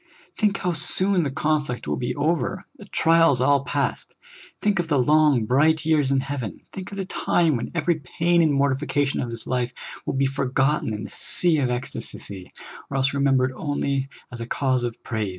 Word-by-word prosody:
Think 210 -2 +1
how 180 - -1
soon 185 +4 +1
the 150 - -1
conflict 150 -2 -1
will - - 0
be 125 - -3
over, 165 +5 -1
the 205 - -10
trials 165 -7 +3
all 140 +1 +3
past! - - -2 0.4
think 205 -3 +1
of 175 - -1
the 150 -3 +2
long, 150 -2 +4
bright 155 +6 +3
years 155 -4 +3
in 135 -1 +2
heaven! 140 -6 -5
think 190 0 -7
of 200 - -8
the 195 - -2
time 170 -4 +1
when 115 - -3
every 170 -1 +1
pain 170 +5 +1
and 160 -2 +3
mor 140 -1 +2
tification 140 0 -1
of 120 - -4
this 115 -1 -7
life 125 -1 -1 0.4
will - - -1
be 135 +1 +2
forgotten 135 0 0
in 105 0 -4
the - - -8
sea 170 -4 +1
of 130 -3 +1
ecstacy, 100 -6 -5 0.4
or 140 - -2
else 135 0 +2
remembered 135 -2 +2
onl}^ 140 -2 -1 0.2
as 120 -1 -7
a 115 - -5
cause 130 -1 0
of 120 -2 -5
praise 110 -3 -2
140 Hz, 195 wpm, -24 LUFS, 130-160 Hz, 0.4 s, long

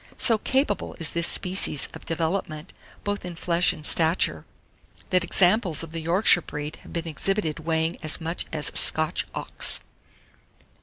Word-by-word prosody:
So 225 -3 +5
capable 265 -3 -1
is 165 - -2
this 170 0 +1
species 180 -6 +3
of - - -12
development, 165 -1 -3 0.3
both 205 0 -4
in 180 -1 -7
flesh 170 +1 +2
and 150 - -8
stature, 165 +3 +2 0.7
that 180 -1 +3
examples 180 -2 +1
of 165 - -9
the 165 0 -5
Yorkshire 175 +2 +4
breed 150 -1 -7
have - - -16
been 170 -1 -4
exhibited 165 +1 -1
weighing 160 0 -2
as 155 -2 -1
much 165 +1 -3
as 150 -3 -2
a - - -5
Scotch 155 -1 +2
ox. - - 0
170 Hz, 155 wpm, -24 LUFS, 160-185 Hz, 0.7 s, So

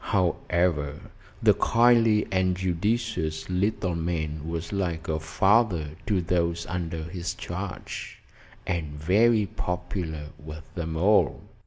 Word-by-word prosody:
However, 85 -5 +1 0.4
the - - +7
kindly 115 -2 +4
and 95 -1 +2
judicious 95 -2 -1
little 95 0 0
man 80 -2 -2
was 85 +2 -4
like 85 -4 -2
a 80 -1 0
father 85 0 +2 0.2
to 100 -4 +2
those 85 -1 0
under 85 -3 -3
his 85 +1 -4
charge, 90 +1 -6 0.5
and 80 -4 -3
very 105 +7 +4
popular 90 -4 -4
with 75 +1 -8
them 80 -2 -4
all. 100 +6 +3
90 Hz, 115 wpm, -26 LUFS, 80-100 Hz, 0.5 s, the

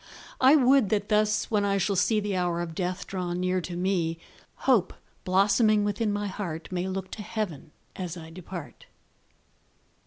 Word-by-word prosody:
I 265 +3 +7
would 265 -5 +5
that 205 -1 0
thus, 215 0 +2
when 210 -2 +2
I 200 0 +1
shall 195 +1 0
see 215 +4 +3
The 205 -2 -2
hour 175 -2 0
of 170 -1 -4
death 180 +2 -3
draw 180 -2 -3
near 185 +1 0
to 175 +1 -6
me, 175 -3 0 0.5
Hope, 230 -9 +3 0.3
blossoming 205 +3 +4
within 205 +1 0
my 205 0 -2
heart, 185 -5 -5
May 180 0 -2
look 190 0 -4
to 215 - -6
heaven 205 -8 -4 0.3
as 180 -2 -5
I 160 -1 -10
depart. 175 -1 -9
190 Hz, 165 wpm, -27 LUFS, 175-210 Hz, 0.5 s, I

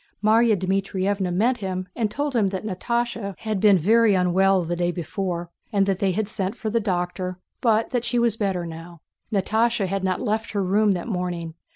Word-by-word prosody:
Márya 220 0 +4
Dmítrievna 190 0 -1
met 230 +8 +2
him 185 -3 -4
and 225 -3 0
told 285 +4 -2
him 215 -4 +3
that 190 +2 -4
Natásha 225 0 -2
had 215 -3 -2
been 205 -1 +6
very 215 +4 +4
unwell 185 +1 +3
the 170 +1 -2
day 175 0 0
before 175 0 -4 0.2
and 200 -3 +3
that 195 -1 0
they 195 - +2
had 200 +3 -1
sent 195 -2 -3
for 220 - -4
the 230 - +2
doctor, 180 -2 -2 0.2
but 225 -2 +2
that 245 -3 0
she 240 0 -1
was 235 -2 +2
better 195 -5 -1
now. 165 0 -9 0.3
Natásha 220 +2 +1
had 195 +1 -2
not 185 -1 0
left 220 -1 -2
her 200 -1 0
room 205 +2 +3
that 180 +2 -4
morning. 180 -5 -3
195 Hz, 195 wpm, -24 LUFS, 180-220 Hz, 0.3 s, been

